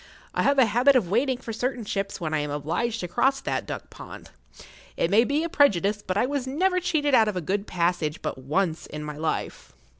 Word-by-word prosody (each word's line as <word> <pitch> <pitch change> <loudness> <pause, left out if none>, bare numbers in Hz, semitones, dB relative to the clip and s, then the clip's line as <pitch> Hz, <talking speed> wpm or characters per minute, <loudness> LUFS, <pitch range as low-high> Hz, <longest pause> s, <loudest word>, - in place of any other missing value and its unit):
I - - 0
have 280 0 +3
a 260 - +6
habit 245 +6 +4
of 195 -9 +2
waiting 255 +4 +2
for 235 -2 -7
certain 245 0 -2
ships 195 -1 -3
when 160 -3 -3
I 155 - +1
am 150 0 -3
obliged 165 +11 -2
to 180 - -3
cross 270 +10 +1
that - - -3
duck - - -7
pond. - - -11 0.7
It 170 - 0
may 220 +3 +6
be 285 +5 0
a - - -1
prejudice, 210 - +2
but 185 -1 -3
I 225 - +3
was 275 -1 -2
never 365 +7 +1
cheated 315 -5 0
out 225 -3 +6
of 210 - -2
a - - +1
good 195 +5 -2
passage 170 -3 -1
but - - -3
once 160 +5 -1
in 150 0 -7
my 150 -1 -6
life. 155 - -4
210 Hz, 230 wpm, -25 LUFS, 170-265 Hz, 0.7 s, a